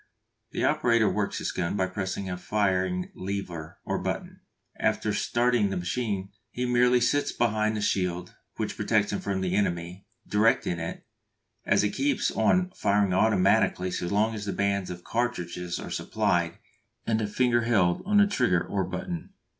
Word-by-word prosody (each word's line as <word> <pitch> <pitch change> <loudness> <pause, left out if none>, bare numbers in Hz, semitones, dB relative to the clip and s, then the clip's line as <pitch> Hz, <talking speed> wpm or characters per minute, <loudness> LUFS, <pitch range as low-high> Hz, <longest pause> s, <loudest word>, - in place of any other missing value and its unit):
The - - -3
operator 115 -2 +3
works 105 -1 -1
this - - -2
gun 90 +1 -2
by 95 - +2
pressing 95 +1 -4
a 90 - -3
firing 95 -1 0
lever 90 -4 -5
or - - -1
button. - - -4 0.4
After - - 0
starting 120 -3 +2
the 95 - -2
machine 95 +1 -2 0.2
he 125 - -3
merely 125 0 +4
sits 145 +4 +1
behind 110 -2 +1
the - - -2
shield, 90 -3 -1 0.2
which - - -3
protects 105 -2 +1
him - - -1
from 95 -1 -2
the 90 -1 -1
enemy, 90 -1 -2 0.2
directing 105 -4 +2
it, 85 0 -6 0.6
as - - +4
it 105 - +1
keeps 285 0 +1
on 185 0 +2
firing 100 - +1
automatically 95 -2 +3
so 90 - -2
long 105 +4 +1
as 105 -2 -5
the 100 - -1
bands 100 0 0
of 90 -1 -7
cartridges 90 -7 -2
are - - -7
supplied 85 -1 0 0.5
and 110 -1 +1
a 105 - -1
finger 120 +2 +2
held 95 -7 +2
on 210 +1 +2
the 205 - +7
trigger 120 - +1
or 100 -1 -1
button. 165 - -5
100 Hz, 165 wpm, -27 LUFS, 90-115 Hz, 0.6 s, the